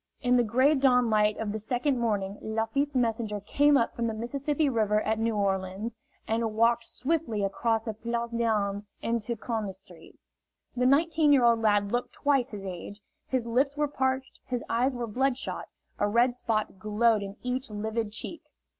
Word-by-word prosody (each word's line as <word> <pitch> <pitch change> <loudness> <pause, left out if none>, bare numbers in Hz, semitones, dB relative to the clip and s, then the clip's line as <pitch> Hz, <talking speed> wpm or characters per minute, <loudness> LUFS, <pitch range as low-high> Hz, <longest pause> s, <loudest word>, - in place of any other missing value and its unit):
In 250 0 +3
the 245 - +5
gray 255 +7 +3
dawnlight 240 -6 +3
of 220 -2 -2
the 215 - -3
second 250 +4 0
morning 205 -4 -1
Lafitte's 245 +6 -1
messenger 225 -4 0
came 285 +8 +3
up 230 - 0
from 235 0 -1
the 225 - -2
Mississippi 280 +6 -1
River 215 -5 +2
at 220 +1 0
New 225 0 0
Orleans, 195 +2 -1 0.3
and 225 -1 -1
walked 230 +1 +3
swiftly 260 -9 -1
across 225 +3 0
the 220 - -3
Place 235 +2 -3
d'Armes 210 -4 0 0.2
into 235 0 -1
Conde 220 -4 -3
Street. 180 -4 -16 0.6
The 250 0 +2
nineteen 310 +2 +4
year 275 -4 +5
old 230 -1 +4
lad 205 -2 +2
looked 245 0 -2
twice 275 -3 +1
his 205 -4 -7
age; 190 +2 -7 0.3
his 255 -3 -1
lips 270 +5 +1
were 295 0 +2
parched, 265 -1 -2
his 245 -2 -3
eyes 250 +3 +1
were 240 -1 -2
bloodshot, 260 +4 -2 0.3
a 205 - +2
red 240 +3 +3
spot 215 -5 -2
glowed 215 +2 +2
in 200 +1 -7
each 250 +1 -2
livid 215 +1 -3
cheek. 235 +9 -5
230 Hz, 170 wpm, -28 LUFS, 210-255 Hz, 0.6 s, the